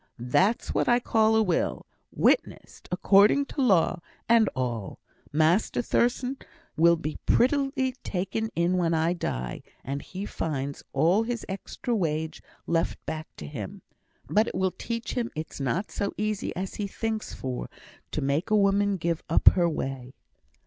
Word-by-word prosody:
that's 180 - +1
what - - +1
I 240 0 +5
call 220 -2 +3
a 220 - +4
will; 180 -5 -1 0.3
witnessed - - 0
according 200 +9 +5
to 280 - -4
law, 185 -7 +3 0.3
and 230 -3 +5
all. 120 -6 -3 0.3
Master 160 +11 +2
Thurstan 250 +3 +1 0.4
will 170 +1 +5
be 155 -2 -5
prettily 270 0 +2
taken 195 +4 -2
in 175 +2 +2
when 170 -2 +2
I 165 +2 +2
die, 65 - -4 0.2
and 140 +1 -4
he 190 +2 -6
finds 140 -7 -3
all 165 +9 +3
his 235 0 -3
extra 200 +4 -3
wage 160 -4 -2 0.2
left 165 0 0
back 155 0 -4
to 75 - -8
him. 70 - -7 0.4
But 215 +2 +3
it - - -5
will 190 -1 +1
teach 230 -1 -4
him 235 -2 -1
it's 155 0 -6
not 165 +9 -1
so 200 - -3
easy 215 -1 -1
as 190 +1 -4
he 200 - -1
thinks 220 +2 -3
for, 130 -1 -4 0.4
to - - -3
make 140 +5 0
a 215 - +4
woman 200 0 +3
give 170 -1 -1
up - - +7
her 175 -2 +2
way." 135 -4 -5
185 Hz, 155 wpm, -27 LUFS, 155-220 Hz, 0.4 s, up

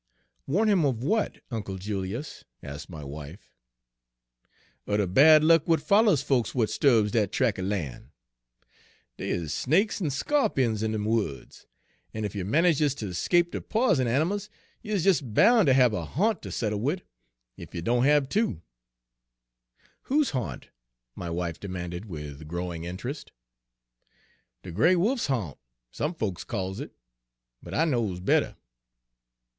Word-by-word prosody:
"Warn 200 +11 +2
him 195 -6 +3
of 125 -5 0
what, 215 +8 0
Uncle 100 -4 -4
Julius?" 100 +7 -5 0.2
asked 70 +4 -8
my 80 -4 -8
wife. 75 +6 -10 1.4
"Er 105 - +2
de 105 - +2
bad 150 - +6
luck 165 -1 +5
w'at 165 -1 +3
follers 200 - +3
folks 130 -6 0
w'at 115 -5 0
'sturbs 115 -7 +3
dat 105 -4 +1
trac' 115 -7 +1
er - - -2
lan'. 90 -10 -4 1.1
Dey - - -4
is 80 -4 -2
snakes 195 - +1
en 170 - 0
sco'pions 135 - +1
in 110 0 0
dem 105 -1 -2
woods. 105 -11 -3 0.5
En 110 -1 -2
ef 100 - -4
you 100 -3 -3
manages 150 - +2
ter 105 -8 -5
'scape 175 - +2
de - - -4
p'isen 215 - +1
animals, 175 - 0 0.3
you 215 0 -3
is 185 - 0
des 180 -7 +3
boun' 205 - +4
ter 135 - +6
hab 125 -3 +4
a 90 - -2
ha'nt 205 - 0
ter - - -8
settle 105 -2 -2
wid, 150 - -1 0.6
ef - - -10
you 85 - -4
doan 120 +5 +2
hab 145 0 +4
two." 165 - -1 1.5
"Whose 290 +1 +2
haunt?" 120 - -4 0.5
my 85 - -5
wife 85 -1 -3
demanded, 90 -1 -6
with 75 -5 -8
growing 85 0 -4
interest. 120 - -6 1.3
"De 90 - -8
gray 160 - +4
wolf's 225 +9 +1
ha'nt, 110 - -2 0.3
some 155 +4 -3
folks 100 - -3
calls 95 -4 -4
it, - - -7 0.7
but - - -8
I 160 - +3
knows 115 - -1
better." 90 - +1
115 Hz, 150 wpm, -27 LUFS, -, 1.5 s, bad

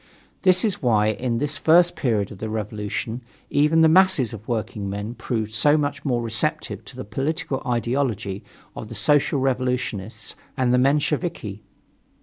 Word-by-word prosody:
This 185 +1 +4
is 210 - -1
why 110 -5 +3
in 115 +2 -1
this 145 +2 -1
first 170 +2 +5
period 110 -7 0
of 100 - -10
the 110 - -4
revolution 110 +2 -4 0.3
even 150 +3 +3
the 160 - +7
masses 160 - +4
of 110 0 -10
workingmen 105 -2 -3
proved 110 -3 -3
so 145 +7 +4
much 145 -1 -2
more 120 -4 0
receptive 110 -1 -1
to - - -11
the - - -7
political 135 +5 -2
ideology 115 -4 -1 0.3
of 110 - -7
the 115 - -8
Social 140 +6 +2
Revolutionists 125 -5 -2 0.2
and 125 -1 +2
the 125 - +4
Mensheviki. 140 - 0
125 Hz, 150 wpm, -23 LUFS, 110-145 Hz, 0.3 s, the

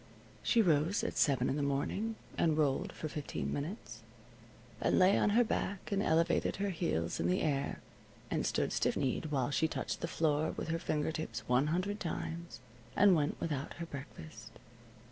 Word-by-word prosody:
She 230 -2 +4
rose 165 +2 +2
at - - -2
seven 135 -4 +3
in 140 - 0
the - - 0
morning, 145 +11 -1 0.2
and 160 -2 +2
rolled 145 -3 +1
for 155 - -5
fifteen 150 -2 -4
minutes, 160 +10 -5 0.8
and - - +2
lay 185 +2 +6
on - - +3
her 245 - +7
back 200 -3 -3
and 200 0 +1
elevated 165 -2 +2
her 200 0 -1
heels 85 - -1
in 85 - +1
the 90 - +1
air, 140 -3 -1 0.5
and - - 0
stood - - 0
stiff - - +1
kneed 135 +4 -1
while 140 -3 0
she 160 +3 +2
touched - - -4
the 170 - -1
floor 155 -1 +1
with - - -4
her 165 +1 0
finger 150 -1 -1
tips 160 0 -5
one 125 +4 +3
hundred 185 +6 -1
times, 170 -1 -5 0.3
and 205 -1 +6
went 150 -3 +1
without 145 -4 -3
her 170 - -5
breakfast. 140 - -9
160 Hz, 180 wpm, -33 LUFS, 140-180 Hz, 0.8 s, her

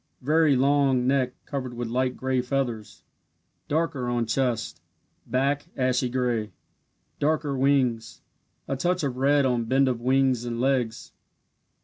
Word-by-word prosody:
Very 155 +1 +3
long 135 -1 +2
neck 130 -1 +1
covered 130 -4 -5
with 120 0 -4
light 125 +2 -1
gray 130 -1 0
feathers 125 -4 -3 0.6
darker 145 -5 -1
on 120 -1 0
chest 120 0 -1 0.5
back, 140 +5 0
ashy 125 -1 +1
gray 120 -4 -1 0.7
darker 150 -1 0
wings 130 -4 0 0.4
a 135 - -1
touch 180 +5 0
of 130 -3 -2
red 140 +1 +3
on 120 -3 0
bend 135 +3 +3
of 125 -2 -1
wings 130 -1 +2
and 120 -1 -4
legs. 125 -3 -1
130 Hz, 130 wpm, -25 LUFS, 120-140 Hz, 0.7 s, Very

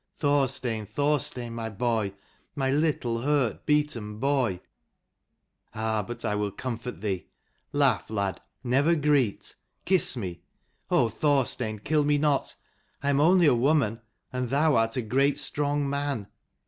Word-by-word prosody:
Thorstein, 130 -6 0
Thorstein: 125 -1 -1
my 115 -1 -4
boy, 110 -2 -1 0.4
my 135 -2 0
little 140 -6 0
hurt 140 -4 0
beaten 145 -9 0
boy! 130 -7 0 1.2
Ah, 110 0 0
but 120 0 -6
I - - 0
will 105 0 -1
comfort 120 +3 -6
thee. 95 -5 -3 0.4
Laugh 140 -4 +2
lad, 100 -3 -2 0.2
never 140 +7 +3
greet: 145 -8 +1 0.3
kiss 185 -7 +3
me. 90 -7 -5 0.5
Oh 120 - +3
Thorstein, 125 -3 0
kill 150 +8 +1
me 145 0 +2
not: 145 -1 0 0.5
I 140 - +2
am 140 - +2
only 175 +3 +5
a 145 - +6
woman, 120 -3 +2 0.3
and 125 -1 -2
thou 150 +3 +3
art 115 +1 +1
a 125 - 0
great 135 +5 +2
strong 145 0 0
man. 140 -6 -2
130 Hz, 135 wpm, -27 LUFS, 110-145 Hz, 1.2 s, a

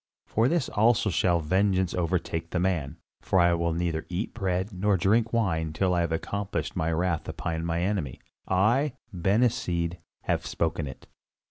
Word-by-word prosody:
For 115 +2 +2
this 165 -2 +1
also 110 0 +3
shall 85 -1 +2
vengeance 95 +2 +1
overtake 85 -1 -1
the 90 - -1
man, 85 -7 -1 0.2
for 95 - +2
I 85 0 +5
will 85 0 0
neither 80 -1 -2
eat 90 +5 -3
bread 95 -1 -1
nor 100 +2 +2
drink 110 +5 +2
wine 80 -9 0
till 90 +3 +1
I 90 - +2
have 85 -1 -1
accomplished 100 +5 -3
my 80 +1 0
wrath 85 0 -1
upon 80 0 -3
mine 85 +1 0
enemy. 90 -9 -2 0.3
I, 120 +10 +2 0.2
Ben 95 +6 +2
Hesed, 85 -7 0 0.3
have - - 0
spoken 80 -2 -1
it." 65 - -10
90 Hz, 165 wpm, -27 LUFS, 85-100 Hz, 0.3 s, I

